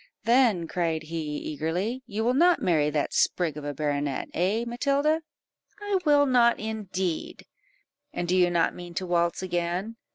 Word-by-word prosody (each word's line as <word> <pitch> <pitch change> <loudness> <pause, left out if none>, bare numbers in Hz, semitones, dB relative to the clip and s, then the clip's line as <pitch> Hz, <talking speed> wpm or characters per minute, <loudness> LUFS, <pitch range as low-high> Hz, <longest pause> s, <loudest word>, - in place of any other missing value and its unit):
"Then," 230 -8 +3
cried 165 -2 -1
he, 155 -2 -4
eagerly, 175 - -3
"you 220 0 -3
will 245 +2 +2
not 345 +5 +4
marry 155 -5 +2
that 150 -1 -1
sprig 170 -5 +1
of 150 - -7
a 145 - -3
baronet 145 -1 -2
eh, 195 +7 0
Matilda?" 280 +6 +1 0.6
"I 410 -2 0
will 290 -1 +5
not 245 -3 +4
indeed." 190 -6 -4 0.7
"And 175 - -3
do 180 - +1
you 180 -1 +4
not 170 -1 +1
mean 175 -1 -10
to 185 - -2
waltz 170 0 0
again?" 180 +5 -2
180 Hz, 160 wpm, -26 LUFS, 165-235 Hz, 0.7 s, will